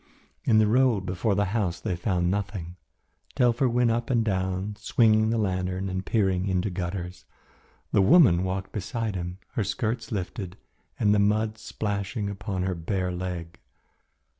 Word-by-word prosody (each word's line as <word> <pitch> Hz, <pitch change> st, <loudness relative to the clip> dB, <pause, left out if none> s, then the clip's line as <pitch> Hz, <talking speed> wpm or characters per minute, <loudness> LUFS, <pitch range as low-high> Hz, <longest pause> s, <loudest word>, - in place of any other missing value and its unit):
In 110 Hz, -, +4 dB
the 110 Hz, -, +5 dB
road 115 Hz, -3 st, +3 dB
before 95 Hz, +3 st, 0 dB
the 100 Hz, +2 st, +2 dB
house 95 Hz, -7 st, 0 dB
they 95 Hz, -1 st, -2 dB
found 90 Hz, -1 st, 0 dB
nothing. 95 Hz, -3 st, -3 dB, 0.6 s
Telfer 125 Hz, +1 st, +3 dB
went 120 Hz, 0 st, +2 dB
up 115 Hz, +1 st, -1 dB
and 120 Hz, -3 st, +2 dB
down 95 Hz, 0 st, -1 dB
swinging 110 Hz, 0 st, +3 dB
the 115 Hz, -, +1 dB
lantern 95 Hz, -2 st, -1 dB
and 95 Hz, 0 st, -3 dB
peering 95 Hz, -3 st, +1 dB
into 95 Hz, +1 st, 0 dB
gutters. 90 Hz, 0 st, -5 dB, 0.7 s
The 100 Hz, -, +4 dB
woman 95 Hz, -, +6 dB
walked 95 Hz, 0 st, -3 dB
beside 110 Hz, +1 st, -3 dB
him, 90 Hz, 0 st, -4 dB
her 110 Hz, -, -1 dB
skirts 110 Hz, +3 st, -2 dB
lifted 95 Hz, -1 st, -4 dB, 0.4 s
and 105 Hz, -1 st, +4 dB
the 105 Hz, -, +3 dB
mud 110 Hz, +2 st, +1 dB
splashing 100 Hz, -1 st, -3 dB
upon 100 Hz, -2 st, -3 dB
her 95 Hz, 0 st, 0 dB
bare 90 Hz, +2 st, -2 dB
leg. 90 Hz, -2 st, -5 dB
100 Hz, 155 wpm, -26 LUFS, 90-110 Hz, 0.7 s, woman